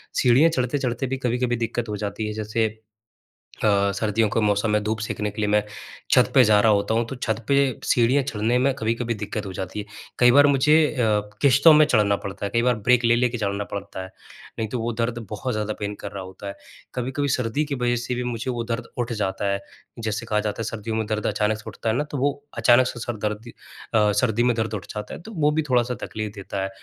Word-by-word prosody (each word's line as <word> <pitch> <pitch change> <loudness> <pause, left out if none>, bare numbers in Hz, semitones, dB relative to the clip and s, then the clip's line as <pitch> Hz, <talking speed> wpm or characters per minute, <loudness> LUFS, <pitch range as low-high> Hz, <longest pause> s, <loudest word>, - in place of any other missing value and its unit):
सीढ़ियाँ 130 +6 +5
चढ़ते-चढ़ते 130 -2 -1
भी 135 +1 -2
कभी-कभी 125 -1 0
दिक्कत 115 0 -3
हो 105 - -3
जाती 105 +1 -3
है। 105 - -4
जैसे 110 +1 0 1.0
अ, 100 -1 +3
सर्दियों 110 +1 +1
के 115 - 0
मौसम 105 0 +1
में 105 0 +1
धूप 110 +1 -2
सेकने 105 -1 -3
के 105 - -5
लिए 105 - +1
मैं, 105 0 +3 0.5
छत - - +5
पे 130 - +7
जा 105 -2 +5
रहा 110 +1 +4
होता 100 +1 +1
हूँ। 115 +1 +1
तो - - -5
छत 110 -3 -2
पे, 140 - +3 0.3
सीढ़ियाँ 125 +4 +3
चढ़ने 115 0 0
में 135 +2 +2
कभी-कभी 115 +2 -1
दिक्कत 105 0 -5
हो 95 - -6
जाती 95 +2 -5
है। 105 - -5 0.3
कई 125 0 +7
बार 145 +3 +7
मुझे 140 +2 +4 0.2
अ, - - -4 0.4
किश्तों 140 +3 +6
में 155 0 +7
चढ़ना 105 -8 +3
पड़ता 100 0 -6
है, - - -2
कई 115 - +3
बार 125 0 +2
ब्रेक 125 0 +5
ले 115 0 +5
लेके 120 0 +1
चलना 100 -2 -2
पड़ता 100 -2 -5
है। 95 - -9 0.5
नहीं 110 - -1
तो 125 - -3
वो 115 +1 -1
दर्द 115 +1 0
बहुत 120 +4 -3
ज़्यादा 110 0 -2
पेन 105 0 -3
कर - - -6
रहा 100 -2 -6
होता 95 +2 -10
है। 100 - -6 0.4
कभी-कभी 130 +3 -2
सर्दी 125 +4 0
की 145 -1 -3
वजह 120 -1 0
से 120 +1 -3
भी 125 - -2
मुझे 120 +1 -3
वो 120 -1 -3
दर्द 115 +1 -4
उठ 120 -1 -2
जाता 100 -2 -2
है, 100 - -1 0.4
जैसे 110 0 -3
कहा 105 -2 0
जाता 105 +1 -3
है - - -1
सर्दियों 110 0 -4
में 110 0 -1
दर्द 105 -1 -1
अचानक 105 +1 0
से 105 - -13
उठता 110 +1 -4
है 110 - +1
ना, 145 - +1
तो 150 -1 -6
वो 140 +2 +2 0.3
अचानक 120 +1 +5
से 120 - -6
सर 120 -1 -4
दर्द 105 +3 -4 0.4
अ, 105 -2 +4
सर्दी 115 +1 +1
में 120 -1 +2
दर्द 110 -1 -2
उठ 100 -4 -4
जाता 105 0 -6
है, - - -8
तो 220 - -11
वो 150 -5 +2
भी 155 +1 +1
थोड़ा-सा 125 0 +2
तकलीफ़ 110 -1 -5
देता 100 -1 -4
है। 95 - -2
115 Hz, 240 wpm, -23 LUFS, 105-125 Hz, 1.0 s, पे